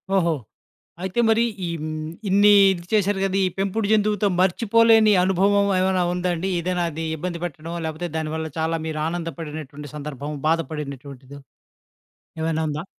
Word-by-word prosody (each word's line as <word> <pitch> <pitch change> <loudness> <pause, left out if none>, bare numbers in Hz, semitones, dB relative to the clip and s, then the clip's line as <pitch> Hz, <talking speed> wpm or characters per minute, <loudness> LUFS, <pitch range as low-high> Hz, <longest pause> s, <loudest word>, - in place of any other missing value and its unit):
ఓహో! 170 -3 +3 0.7
అయితే 190 +5 -1
మరి 225 +1 +4 0.2
ఈ - - -2
హ్మ్. 155 0 -4 0.2
ఇన్ని 200 +2 +5 0.2
ఇది 175 -2 -7
చేసారు 205 -2 +2
కదా! 195 0 0
ఈ - - +2
పెంపుడు 200 +2 0
జంతువుతో 210 -1 +2
మర్చిపోలేని 225 +3 +4
అనుభవం 195 +2 +3
ఏమైనా 185 0 +2
ఉందా 180 0 -1
అండి? 175 +3 -3
ఏదైనా 175 +1 -1
అది 160 +1 -5
ఇబ్బంది 170 +1 -4
పెట్టడం, 165 0 -6
లేకపోతే 160 +2 -4
దానివల్ల 160 0 -3
చాలా 160 +1 0
మీరు 155 -1 -3
ఆనందపడినటువంటి 155 -4 -6
సందర్భం, 145 -1 -6 0.2
బాధపడినటువంటిదో, 140 -4 -4 1.0
ఏమైనా 160 0 0
ఉందా? 150 +3 -4
170 Hz, 140 wpm, -23 LUFS, 155-195 Hz, 1.0 s, ఇన్ని